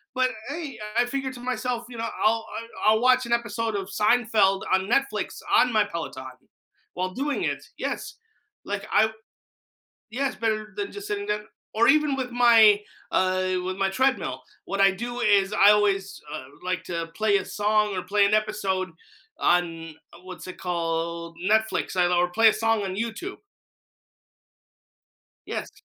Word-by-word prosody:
But 255 0 +2 0.2
hey, 300 -5 -6 0.2
I 240 - +4
figured 265 +1 -3
to 240 - -10
myself, 250 -1 -2
you 240 - -9
know, 230 0 -2 0.2
I'll 225 +1 +2 0.4
I'll 220 +1 +5
watch 255 0 +4
an 235 - -1
episode 230 -2 -1
of 195 -1 -4
Seinfeld 215 -3 +2
on 190 +2 +1
Netflix 275 +2 0 0.2
on 250 - +5
my 215 -1 +4
Peloton 170 -8 -6 0.7
while 185 +1 -2
doing 285 +2 -2
it - - -2
yes, - - -4 0.5
like 205 +1 -4
I 220 +1 +4 1.0
yeah, 275 +4 0
it's - - -6
better 215 -2 -2
than 405 -1 -3
just 405 0 -8
sitting 405 -1 -3
there, 210 0 -1 0.3
or 225 +2 +3
even 300 -1 +4
with 255 -1 -3
my, 225 -4 +6 0.3
uh 185 0 +1
with 185 0 -3
my 195 0 +1
treadmill, 265 +6 0 0.2
what 195 0 -1
I 195 0 +6
do 240 +5 -5
is 205 -2 +3
I 205 0 +6
always, 200 -2 +1
uh, - - -5 0.2
like, 185 -1 -2
to 170 -2 -3
play 215 -2 +3
a - - -4
song 210 -1 +1
or 185 - -2
play 200 +2 +3
an 205 - +1
episode 200 -4 0 0.5
on 165 -2 0 0.3
what's 185 -1 -9
it 185 - -8
called, 170 -1 -3
Netflix, 220 -2 +1 0.2
or 175 0 +3
play 225 +3 +6
a - - +1
song 225 -1 +1
on 190 -1 -3
YouTube. 230 - -4 2.1
Yes. - - -4
215 Hz, 160 wpm, -25 LUFS, 190-240 Hz, 2.1 s, my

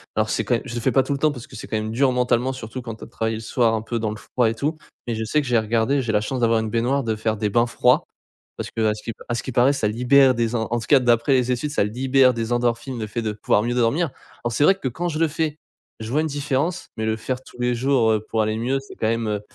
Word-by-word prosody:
alors - - +1
c'est - - 0
quand 120 - +2
mê 115 - -2
je 120 -2 -6
le 120 - -2
fais - - +2
pas 135 - +4
tout 140 - -2
le - - -1
temps 155 +1 +3
parce 125 -5 -9
que - - -13
c'est - - -8
quand 110 - -1
même 110 0 -3
dur 130 +3 +2
mentalement 125 0 +1
surtout 130 0 -7
quand 115 -2 -6
tu - - -13
as - - -13
travaillé 110 0 -2
le - - -7
soir 115 0 +1
un 110 - 0
peu 115 +2 -3
dans 110 -2 -1
le 105 - -6
froid 120 +1 0
et - - -2
tout, 150 +7 -2 0.3
mais 120 - -1
je 110 - -3
sais 150 +8 +1
que 140 - -7
j'ai 120 -1 +3
regardé, 115 +5 +1
j'ai 115 - -1
la 105 -1 +2
chance 125 +4 -3
d'avoir 115 -1 +3
une 110 0 -2
baignoire, 125 +5 0
de 110 -2 -1
faire 110 0 -1
des 105 0 -1
bains 120 +4 +2
froids. - - +3 0.5
Parce - - -5
qu'à 110 -1 +1
ce 105 0 -10
qui - - -4
p - - -45
à - - 0
ce - - -3
qui 130 - -5
paraît 125 +4 +4
ça 125 -6 0
libère 130 +4 +5
des 115 0 0
en 110 -2 -1
en 120 - +1
tout 115 - -7
cas 145 - +6
d'après 120 +2 +3
les 125 -1 +2
études 125 +4 -1
ça 150 - +2
libère 130 +3 +3
des 115 0 -2
endorphines 120 +1 -1
le 110 - -3
fait 110 +3 -3
de 110 -2 -2
pouvoir 105 0 +1
mieux 120 +1 -1
dormir. 130 +7 +1 0.3
Alors 120 - -1
c'est 145 - +2
vrai 195 - +6
que 190 - -4
quand 175 +8 -3
je 155 -2 -3
le 165 - +3
fais, 155 0 -2 0.4
je 110 - -5
vois 150 +4 +2
une 160 - 0
différence 145 +4 -2
mais 110 - -2
le 110 0 0
faire 125 +3 -4
tous 125 - -16
les 125 0 +1
jours, 125 -2 +2
heu, 110 -1 +1
pour 110 - +1
aller 110 0 0
mieux 130 +4 0
c'est 135 - -13
quand 110 - -1
même, 115 0 -1
heu, 105 -1 -1
120 Hz, 320 wpm, -22 LUFS, 110-135 Hz, 0.5 s, cas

